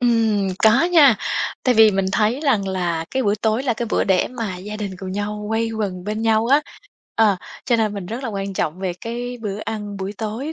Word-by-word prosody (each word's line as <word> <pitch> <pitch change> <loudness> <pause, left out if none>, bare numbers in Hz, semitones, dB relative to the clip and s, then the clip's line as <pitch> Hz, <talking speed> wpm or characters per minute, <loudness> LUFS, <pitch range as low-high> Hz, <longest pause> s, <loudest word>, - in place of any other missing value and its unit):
Ừm, 225 -5 +2
có 225 +8 +5
nha, 310 -9 +6 0.5
tại 250 -2 +4
vì 220 -1 +7
mình 195 -1 0
thấy 225 +6 +1
rằng 220 -10 +1
là 175 -3 -1
cái 265 0 0
bữa 205 0 +2
tối 220 +4 0
là 250 -4 0
cái 235 +1 -3
bữa - - +2
để 190 -2 +2
mà 225 -7 -4
gia 205 +4 -7
đình 210 -2 -4
cùng 190 -1 -6
nhau 210 +1 -3
quây 225 +1 0
quần 195 -5 -3
bên 215 +1 -3
nhau 225 0 +2
á 280 +4 +5 0.5
ờ, 215 -4 +4 0.3
cho 240 - +2
nên 215 -2 0
mình 195 -3 -5
rất 230 +7 -5
là - - -2
quan 195 -2 -4
trọng 160 -1 -2
về 190 -2 -1
cái 245 +2 -5
bữa 205 -2 -4
ăn 210 -2 -5
buổi 195 +1 -4
tối 225 +8 -4
215 Hz, 230 wpm, -21 LUFS, 200-230 Hz, 0.5 s, vì